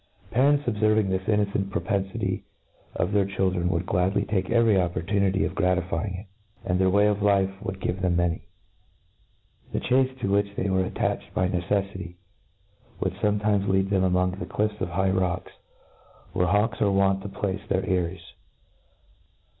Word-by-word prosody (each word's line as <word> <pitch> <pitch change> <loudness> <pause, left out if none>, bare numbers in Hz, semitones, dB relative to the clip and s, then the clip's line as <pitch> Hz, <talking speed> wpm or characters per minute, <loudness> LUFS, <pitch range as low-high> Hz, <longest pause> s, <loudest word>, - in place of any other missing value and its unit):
Parents, 140 +5 +3
obferving 110 -2 +2
this 95 +1 -2
innoceiit 100 -2 +1
propenflty 95 +1 -2 0.5
of 90 - 0
their 100 -2 +2
children^ 95 -3 0
would 90 0 0
gladly 95 0 +1
take 95 -2 -1
every 115 -1 +4
oppor 90 -3 0
tunity 100 -1 +1
of - - -3
gratifying 90 +1 0
it 95 - -6
j - - -22 0.4
«*and 90 0 0
their 95 0 +4
way 100 +2 +4
of 105 -1 +1
life 100 -2 +3
would 100 -2 -5
give 95 0 -2
them 90 -2 +1
many* 85 -2 0 1.3
The - - 0
chace, 130 +1 +2
to - - -1
which 100 0 +1
they 95 0 -1
were 95 0 +2
attached - - -2
by 90 0 +1
neccffity^ 95 -1 -2 0.8
would - - -1
fometimes 105 -1 +1
lead 95 +1 +1
them 95 -2 +3
amoiig 90 0 +1
the 95 - -5
clifts 105 +2 -2
of 90 - -1
high 95 +2 +1
rocks, 95 -2 -1 0.8
wherd 90 - +1
hawks 105 +1 +1
arc 100 -2 +3
wont 95 0 +3
to 100 - -6
place 100 0 -3
their 95 - +1
eyries. 90 -1 -1
95 Hz, 165 wpm, -26 LUFS, 90-100 Hz, 1.3 s, every